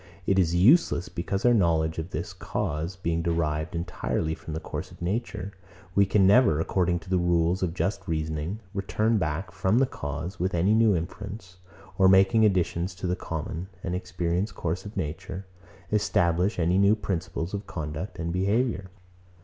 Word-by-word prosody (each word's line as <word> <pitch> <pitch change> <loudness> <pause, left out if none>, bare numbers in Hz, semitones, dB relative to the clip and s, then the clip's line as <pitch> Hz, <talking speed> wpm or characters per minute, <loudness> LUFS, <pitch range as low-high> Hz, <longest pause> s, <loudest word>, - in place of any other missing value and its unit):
It 95 0 +3
is 85 -2 +2
useless; 100 - +4
because 95 +4 -3
our 120 - +6
knowledge 80 -6 +2
of 80 +2 -4
this 85 +1 -4
cause 85 -2 -3
being 85 -3 -1
derived 80 -2 -1
entirely 85 -2 -2
from 80 -1 -7
the - - -2
course - - -6
of - - -15
nature, 100 +1 -3 0.4
we 100 +1 +4
can 100 -2 +4
never, 100 - +5
according 90 +1 +1
to 85 - -13
the 95 - +3
rules 85 +1 +2
of 90 -2 -1
just 100 0 -2
reasoning, 80 +5 -2
return 105 +3 +1
back 85 +3 -2
from 95 +3 +1
the 135 - +5
cause 80 - -5
with 90 +1 0
any 90 +5 +3
new 110 -2 +4
inference, 90 +2 -6 0.4
or 95 - +7
making 95 +4 +5
additions 90 -2 +1
to 95 - -6
the 90 0 +1
common 80 0 -5 0.2
and 90 - -2
experienced 90 +1 -2
course 85 +2 -3
of 100 0 -8
nature, 95 +3 -4 0.5
establish 95 -2 +2
any 90 +2 +2
new 100 +2 +5
principles 95 -3 -3
of 100 0 -4
conduct 80 +4 -5
and 85 0 -3
behaviour. 100 +1 0
90 Hz, 170 wpm, -27 LUFS, 85-100 Hz, 0.5 s, or